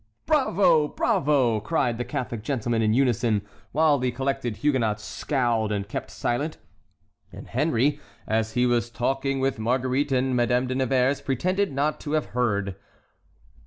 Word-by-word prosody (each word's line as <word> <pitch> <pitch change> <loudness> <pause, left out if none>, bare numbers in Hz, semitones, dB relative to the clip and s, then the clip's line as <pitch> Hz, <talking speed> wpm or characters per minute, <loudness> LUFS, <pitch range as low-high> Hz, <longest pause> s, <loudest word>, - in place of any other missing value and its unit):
" - - -48
"Bravo! 200 - +3
bravo!" 135 -7 +1
cried 115 +2 -1
the - - 0
Catholic 120 -3 -4
gentlemen 120 -2 -1
in 110 -1 +2
unison, 120 -5 +2 0.3
while 150 -1 +3
the 125 0 0
collected 125 -2 -2
Huguenots 115 -8 0
scowled 120 -4 -1
and 100 -1 -2
kept - - -5
silent, 145 +6 -2 0.7
and - - -10
Henry, 145 +1 +1 0.3
as 110 0 -1
he 125 0 +2
was 120 -1 +1
talking 135 +3 -1
with 135 -3 0
Marguerite 130 +5 0
and 130 0 +1
Madame 125 +1 +2
de 130 - -2
Nevers, 130 +1 +1
pretended 185 +9 0
not 145 +3 -1
to 150 - -5
have 155 -1 +1
heard. 100 -6 0
125 Hz, 150 wpm, -25 LUFS, 115-140 Hz, 0.7 s, Bravo